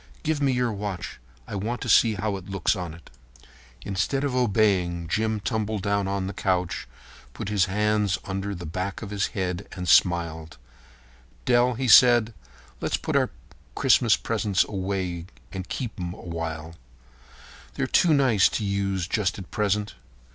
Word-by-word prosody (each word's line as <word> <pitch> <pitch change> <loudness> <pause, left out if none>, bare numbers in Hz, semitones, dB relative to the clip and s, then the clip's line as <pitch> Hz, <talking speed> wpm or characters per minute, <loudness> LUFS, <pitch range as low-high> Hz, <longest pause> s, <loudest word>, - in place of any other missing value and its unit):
Give 155 -2 0
me 140 -1 +3
your 125 -3 0
watch. 100 -2 -5 0.3
I - - -8
want 110 +5 -2
to - - -4
see 110 -2 +5
how 105 0 -2
it 95 0 -9
looks 95 +1 +1
on 90 -4 -5
it." 85 - -17 0.7
Instead 105 +8 -1
of 140 -3 -1
obeying, 95 -8 +1
Jim 110 +4 0
tumbled 110 -2 -2
down 100 -1 0
on 100 -1 -2
the 95 - -4
couch 90 -1 -1 0.4
and - - -27
put - - -5
his 100 -3 +3
hands 105 -1 +1
under 100 +1 -3
the 85 -1 -7
back 90 +7 -4
of 100 - -7
his 100 -1 0
head 90 0 -2
and 90 -1 -5
smiled. 80 -4 +2 0.9
"Dell," 120 -1 +3
said 120 -2 +7
he, 65 - -21 0.3
"let's - - 0
put - - -3
our - - +3 0.5
Christmas - - +4
presents 100 -3 +1
away 95 -3 -3 0.2
and 95 0 -6
keep 120 -5 -4
'em 90 0 -4
a - - -13
while. 80 -2 -5 1.0
They're - - 0
too 165 -4 +4
nice 125 -8 +4
to 105 - -2
use 100 -2 -1
just 95 -4 0
at 95 -3 -10
present. 105 0 0
100 Hz, 165 wpm, -25 LUFS, 90-110 Hz, 1.0 s, said